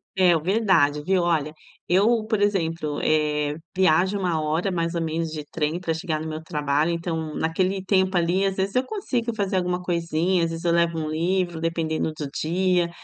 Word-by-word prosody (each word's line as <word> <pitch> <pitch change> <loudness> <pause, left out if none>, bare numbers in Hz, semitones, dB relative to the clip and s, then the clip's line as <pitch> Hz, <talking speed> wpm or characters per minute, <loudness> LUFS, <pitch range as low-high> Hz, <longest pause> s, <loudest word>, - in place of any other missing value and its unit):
É, 185 -2 +5
o 160 - 0
verdade, 185 -6 +2
viu. 185 +3 +2
Olha, 155 -3 0 0.3
eu, 215 +5 +3
por 215 -2 0
exemplo, 165 -7 0
eh, 150 -1 +1 0.2
viajo 185 +2 +3
1 180 -4 0
hora 160 +5 0
mais 170 -1 -1
ou 170 - 0
menos 165 0 -2
de 155 -1 -5
trem 155 +1 -1
pra 170 -3 -2
chegar 160 -1 -2
no 160 - -5
meu 155 0 -5
trabalho, 150 -1 0
então 165 -2 -3
naquele 185 +4 0
tempo 190 -1 +2
ali 175 +3 +2
às 195 -1 0
vezes 195 +1 -2
eu 255 - +3
consigo 255 - -2
fazer 195 -2 0
alguma 180 0 0
coisinha, 170 0 0
às 165 - 0
vezes 165 +1 -6
eu 170 - +3
levo 170 -1 +2
um 155 -1 -3
livro, 175 +1 -1
dependendo 165 -1 -1
do 150 - -4
dia. 175 +1 +1
170 Hz, 195 wpm, -24 LUFS, 160-190 Hz, 0.3 s, É